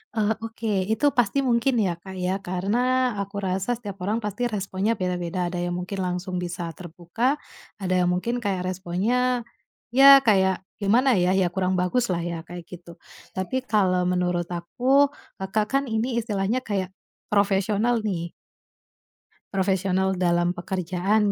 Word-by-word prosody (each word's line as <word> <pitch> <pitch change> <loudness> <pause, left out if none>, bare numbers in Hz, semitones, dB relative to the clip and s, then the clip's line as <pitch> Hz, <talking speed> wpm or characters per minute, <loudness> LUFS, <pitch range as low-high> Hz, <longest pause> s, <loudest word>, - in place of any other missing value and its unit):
Eee, 215 0 +2
oke 220 -4 -2
itu 220 +6 +1
pasti 245 +3 +1
mungkin 245 +1 +2
ya 175 -3 -1
Kak 190 +1 -10
ya, 185 +1 -1
karena, 195 +4 -1 0.4
aku 200 +1 -5
rasa 190 +5 0
setiap 205 -5 -8
orang 215 +4 -1
pasti 210 +4 -1
responnya 200 0 -1
beda-beda. 180 -2 -2
Ada 180 - -3
yang 175 - -2
mungkin 180 +2 -4
langsung 180 0 -2
bisa 175 -1 -4
terbuka, 180 - -2 0.4
ada 190 -3 -4
yang 180 - +2
mungkin 235 +7 -1
kayak 195 -5 -2
responnya, 230 +8 0 0.5
ya 275 +2 +9
kayak 190 -4 +3 0.2
gimana 230 +6 +3
ya, 180 +2 +2
ya 190 -2 +3
kurang 185 0 0
bagus 185 +7 +1
lah 170 -2 -1
ya, 170 -1 -3
kayak 175 0 -8
gitu. 175 -1 -10 0.4
Tapi 190 +7 -3
kalau 185 -5 +2
menurut 180 -1 0
aku, 255 +12 +2 0.3
Kakak 195 +3 0
kan 275 +1 +2
ini 220 +2 0 0.2
istilahnya 210 +3 -1
kayak 195 -5 -2 0.4
profesional 205 +3 +2
nih. 170 -4 -3 1.2
Profesional 190 0 +1
dalam 175 -1 +2
pekerjaan 190 +3 0
190 Hz, 145 wpm, -25 LUFS, 180-220 Hz, 1.2 s, ya